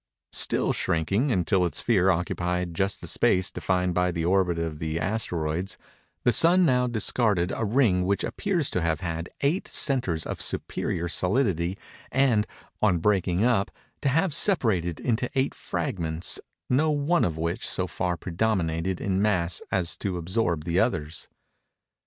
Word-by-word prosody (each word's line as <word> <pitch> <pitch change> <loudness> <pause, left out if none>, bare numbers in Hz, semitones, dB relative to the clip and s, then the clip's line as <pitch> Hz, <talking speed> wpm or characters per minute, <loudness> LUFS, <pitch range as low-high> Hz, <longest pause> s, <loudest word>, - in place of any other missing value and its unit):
Still - - +1
shrinking, 95 - 0
until 90 -2 +2
its 85 - -1
sphere 95 -5 +3
occupied 90 0 -1
just 95 +4 0
the - - -6
space 95 0 +2
defined 90 -1 -1
by 90 +1 +1
the 85 -1 -2
orbit 90 -1 +2
of 80 -2 -3
the 80 0 -2
Asteroids, 90 -2 -2 0.5
the 120 - +4
Sun 180 +2 +5
now 125 -4 +2
discarded 110 -5 0
a 115 - -1
ring 105 -5 +2
which 100 +2 0
appears 180 -8 -1
to 90 - -1
have 85 0 -1
had 85 -1 -4
eight 150 +7 0
centres 120 - +1
of - - -4
superior 85 +1 -1
solidity, 90 -1 0 0.3
and, 125 -5 +2 0.3
on 100 -5 +3
breaking 95 +1 +1
up, 115 -4 +2 0.3
to 140 - +1
have 160 +4 +1
separated 110 - +2
into 120 0 -1
eight 135 +1 +1
fragments 85 - -2 0.3
no 145 +5 +2
one 150 +4 +1
of 80 -2 -1
which 85 +1 -2
so - - 0
far 90 -1 -2
predominated 90 -2 -1
in 95 0 0
mass 90 -5 +1
as 90 -3 +1
to 95 -3 -3
absorb 85 -2 -1
the 85 +2 0
others. 80 -8 -2
95 Hz, 150 wpm, -26 LUFS, 85-120 Hz, 0.5 s, Sun